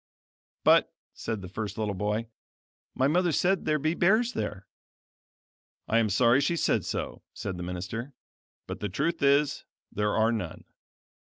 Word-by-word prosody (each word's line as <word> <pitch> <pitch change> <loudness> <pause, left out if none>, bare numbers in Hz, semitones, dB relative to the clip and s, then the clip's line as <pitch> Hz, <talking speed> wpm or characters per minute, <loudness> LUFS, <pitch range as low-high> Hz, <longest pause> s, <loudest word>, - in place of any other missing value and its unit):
"But," - - +5 0.2
said 110 -4 -4
the - - -6
first 100 +2 -5
little 105 -2 -1
boy, 105 +3 -1 0.7
"My 130 - +3
mother 175 +3 +2
said 185 +5 +1
there 155 - +2
be 155 +2 0
bears 220 +8 +3
there." 100 -2 -4 1.2
"I 115 - +3
am 110 -2 +2
sorry 120 +6 +4
she 155 +5 +1
said - - +1
so," - - -4
said 95 -3 -4
the - - -6
minister, 95 +9 -5 0.5
"but - - -6
the 105 - -3
truth 155 - -1
is, 140 +1 +3 0.3
there 105 0 0
are 110 +1 +3
none." 100 -8 -4
115 Hz, 155 wpm, -28 LUFS, 105-150 Hz, 1.2 s, But